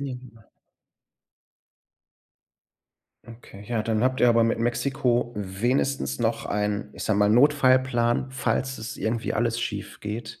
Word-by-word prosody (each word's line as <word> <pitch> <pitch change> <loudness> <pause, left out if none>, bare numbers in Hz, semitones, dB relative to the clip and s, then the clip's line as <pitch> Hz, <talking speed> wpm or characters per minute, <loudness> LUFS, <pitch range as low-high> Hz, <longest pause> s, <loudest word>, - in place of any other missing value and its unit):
Mhm. 125 -4 -8 2.9
Okay. 115 -3 -13
Ja, 115 -3 -1
dann 110 0 0
habt 130 +1 +1
ihr 125 - +6
aber 115 0 +4
mit 115 - 0
Mexiko 120 0 0
wenigstens 120 +9 -1
noch 115 -1 -1
ein, 105 0 -2
ich - - -6
sage 105 -1 +1
mal, 105 0 +4
Notfallplan, 130 -1 +3
falls 130 0 -2
es 110 +1 -6
irgendwie 115 +1 -2
alles 115 +1 0
schiefgeht. 105 +1 -6
120 Hz, 120 wpm, -25 LUFS, 110-130 Hz, 2.9 s, ihr